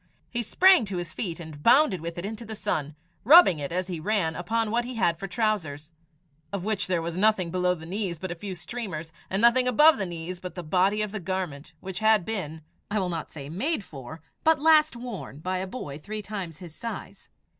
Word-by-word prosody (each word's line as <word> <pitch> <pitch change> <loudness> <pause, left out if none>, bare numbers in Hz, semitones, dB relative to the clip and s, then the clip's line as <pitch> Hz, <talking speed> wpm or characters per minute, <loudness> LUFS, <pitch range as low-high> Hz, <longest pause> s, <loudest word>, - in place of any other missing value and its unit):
He 240 - -1
sprang 370 - +5
to 195 -2 -4
his 175 -3 -5
feet 175 -6 -4
and 155 -3 -9
bounded 235 - +5
with 170 +1 -6
it 175 - -4
into 220 +2 -5
the 220 -1 -7
sun, 150 -7 -2 0.3
rubbing 285 - +8
it 140 +1 -4
as 180 +2 -1
he 175 -3 -4
ran 165 -3 0
upon 220 +5 -1
what 240 +1 +1
he 250 +1 -6
had 170 -7 +1
for 195 - -4
trousers, 175 -9 -2 0.6
of 200 -3 -3
which 210 -2 -1
there 175 -3 0
was 170 0 -4
nothing 190 -3 +2
below 180 0 +1
the 160 -2 -11
knees 185 -1 -3
but 185 +2 -5
a - - -3
few 190 +2 -6
streamers, 175 -6 -5 0.2
and 190 - 0
nothing 250 +2 +5
above 300 +3 +6
the 195 - -1
knees 175 +1 -6
but 180 -1 -8
the 180 - -5
body 190 +6 +2
of 210 - -4
the 215 - -4
garment, 180 -6 -4
which 190 -1 -5
had 215 -4 +4
been 160 -8 -4 0.3
I 210 - -1
will 185 -3 0
not 165 -2 -4
say 140 -3 -8
made 210 - -1
for, 145 0 -10 0.2
but 320 -2 +4
last 310 -2 +5
worn 235 - -7
by 185 +4 -2
a 190 - -3
boy 150 - -7
three 210 +6 -6
times 190 -7 -6
his 175 -3 -11
size. 230 +7 -8
185 Hz, 220 wpm, -26 LUFS, 165-220 Hz, 0.6 s, rubbing